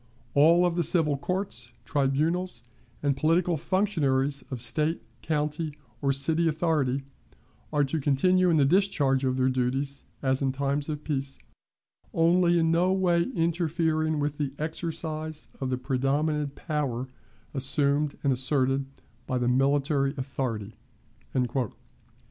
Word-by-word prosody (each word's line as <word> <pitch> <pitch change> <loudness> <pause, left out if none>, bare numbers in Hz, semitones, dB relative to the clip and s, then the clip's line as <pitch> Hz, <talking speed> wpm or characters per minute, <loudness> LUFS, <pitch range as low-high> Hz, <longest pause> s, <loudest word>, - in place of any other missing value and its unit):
All 165 +5 +5
the 175 0 0
civil 160 -3 +4
courts, 140 - -3
tribunals, 150 +1 0 0.4
and 140 -1 +2
political 165 +5 +2
functionaries 145 -7 0
of 130 - -5
State, 155 +7 0 0.2
county, 150 0 -2 0.2
or 140 -1 +2
city 160 +5 +2
authority, 150 -5 0 0.7
are 150 -1 +2
to 150 +3 -1
continue 180 +7 +3
in 165 - +3
the 140 - +4
discharge 145 -6 +2
of 130 -1 0
their 130 0 +2
duties 130 +2 -1 0.2
as 130 0 +1
in 135 -1 +1
times 140 +2 -1
of 150 -1 -4
peace, 135 -2 -2 0.8
only 175 +1 +4
in 165 -1 +2
no 175 +3 +3
way 175 -3 +2
interfering 160 -2 0
with 145 0 -2
the 140 -2 -2
exercise 155 -1 -4
of 130 - -2
the 130 - 0
predominant 140 +3 0
power 135 -6 -2 0.5
assumed 140 +2 +1
and 140 -2 +3
asserted 135 +1 +1 0.4
by 130 - 0
the 125 -1 0
military 140 +2 +2
authority." 125 -6 -3
145 Hz, 125 wpm, -27 LUFS, 135-165 Hz, 0.8 s, All